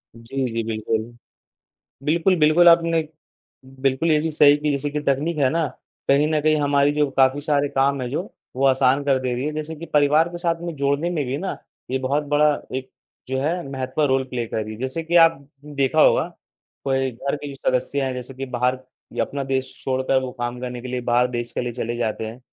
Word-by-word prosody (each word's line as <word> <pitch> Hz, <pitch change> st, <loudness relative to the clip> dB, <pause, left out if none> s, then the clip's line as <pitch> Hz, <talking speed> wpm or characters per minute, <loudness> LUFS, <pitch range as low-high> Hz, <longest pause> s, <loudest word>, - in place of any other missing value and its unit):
जी, 130 Hz, +4 st, -4 dB
जी 115 Hz, 0 st, -1 dB
बिल्कुल। 110 Hz, 0 st, -1 dB, 1.1 s
बिल्कुल, 170 Hz, +4 st, +3 dB
बिल्कुल 155 Hz, +3 st, +6 dB
आपने 165 Hz, -1 st, +4 dB, 0.8 s
बिल्कुल 135 Hz, +4 st, +1 dB
ये 155 Hz, -, +4 dB
भी 160 Hz, +1 st, -1 dB
सही 145 Hz, -1 st, +6 dB
कि 150 Hz, 0 st, -1 dB
जैसे 145 Hz, +1 st, -1 dB
कि 150 Hz, +1 st, -2 dB
तकनीक 150 Hz, +4 st, 0 dB
है 135 Hz, -3 st, +4 dB
ना 165 Hz, 0 st, +1 dB, 0.4 s
कहीं 140 Hz, +2 st, +4 dB
न 155 Hz, -1 st, +2 dB
कहीं 155 Hz, 0 st, +3 dB
हमारी 145 Hz, 0 st, +3 dB
जो 150 Hz, -1 st, +1 dB
काफ़ी 135 Hz, +1 st, +3 dB
सारे 145 Hz, -1 st, +1 dB
काम 140 Hz, 0 st, +1 dB
है 125 Hz, -, -3 dB
जो 150 Hz, -, -1 dB, 0.3 s
वो 135 Hz, +1 st, +2 dB
आसान 135 Hz, +1 st, +3 dB
कर 135 Hz, -2 st, +3 dB
दे 125 Hz, -1 st, -1 dB
रही 125 Hz, +2 st, -3 dB
है। 155 Hz, -, -2 dB
जैसे 155 Hz, +1 st, -4 dB
कि 165 Hz, +3 st, -8 dB
परिवार 150 Hz, +2 st, +3 dB
के 175 Hz, -, -7 dB
साथ 170 Hz, -1 st, -1 dB
में 170 Hz, -1 st, -4 dB
जोड़ने 140 Hz, +5 st, 0 dB
में 155 Hz, -5 st, -1 dB
भी 130 Hz, +2 st, -2 dB
ना 190 Hz, +4 st, -3 dB, 0.3 s
ये 130 Hz, -, 0 dB
बहुत 140 Hz, +3 st, 0 dB
बड़ा 150 Hz, 0 st, +4 dB, 0.2 s
एक 130 Hz, 0 st, -6 dB, 0.4 s
जो 130 Hz, 0 st, -1 dB
है 170 Hz, +5 st, -1 dB
महत्व 130 Hz, +2 st, -2 dB
रोल 135 Hz, -1 st, +1 dB
प्ले 120 Hz, -2 st, -3 dB
कर 110 Hz, -1 st, -3 dB
रही। 110 Hz, 0 st, -7 dB
जैसे 130 Hz, +7 st, -3 dB
कि 170 Hz, +2 st, 0 dB
आप 165 Hz, -2 st, +6 dB, 0.3 s
देखा 145 Hz, 0 st, 0 dB
होगा, 165 Hz, -, +4 dB, 0.6 s
कोई 135 Hz, -1 st, 0 dB
घर 140 Hz, +5 st, -3 dB
के 145 Hz, -1 st, -7 dB
सदस्य 135 Hz, +1 st, -1 dB
है 130 Hz, -, -2 dB
जैसे 125 Hz, +1 st, -7 dB
कि 135 Hz, +1 st, -5 dB
बाहर 125 Hz, 0 st, 0 dB, 0.3 s
या -, -, 0 dB
अपना 140 Hz, -1 st, -5 dB
देश 135 Hz, 0 st, -2 dB
छोड़कर 130 Hz, 0 st, +1 dB
वो 130 Hz, -1 st, -5 dB
काम 120 Hz, 0 st, -3 dB
करने 125 Hz, -1 st, -5 dB
के 130 Hz, -, -7 dB
लिए 125 Hz, 0 st, -2 dB
बाहर 120 Hz, 0 st, +2 dB
देश 120 Hz, -1 st, -4 dB
के -, -, -2 dB
लिए 120 Hz, -1 st, -3 dB
चले 120 Hz, 0 st, -3 dB
जाते 110 Hz, -1 st, -2 dB
हैं 110 Hz, +2 st, -8 dB
140 Hz, 220 wpm, -22 LUFS, 130-150 Hz, 1.1 s, बिल्कुल